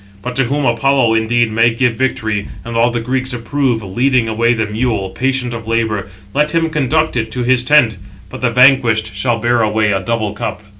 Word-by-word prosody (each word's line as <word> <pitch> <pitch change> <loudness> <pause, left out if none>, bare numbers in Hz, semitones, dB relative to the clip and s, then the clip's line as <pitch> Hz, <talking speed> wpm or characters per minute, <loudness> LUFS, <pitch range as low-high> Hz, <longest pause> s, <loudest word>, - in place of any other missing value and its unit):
But 125 0 -5
to 135 - +2
whom 140 +3 -1
Apollo 120 0 +2
indeed 115 +1 +1
may 115 +2 +3
give 125 -1 +1
victory, 110 -5 -2 0.2
and 115 0 -6
all 115 +1 +3
the 120 0 -2
Greeks 130 +2 -1
approve, 120 -1 -1
leading 120 +5 +1
away 115 +2 +1
the 110 -1 -1
mule, 105 -2 -2
patient 130 -2 -2
of 115 -1 -7
labour, 110 -3 -1 0.3
let 150 +3 0
him 165 -1 +1
conduct 155 +1 0
it 110 -2 -2
to 125 - -2
his 125 0 +2
tent; 125 -6 +3 0.3
but 130 - -10
the 125 - +2
vanquished 115 -3 +3
shall 115 +3 -1
bear 120 +1 +1
away 110 -1 +1
a 95 - 0
double 110 0 -2
cup." 105 - -5
120 Hz, 200 wpm, -16 LUFS, 110-130 Hz, 0.3 s, may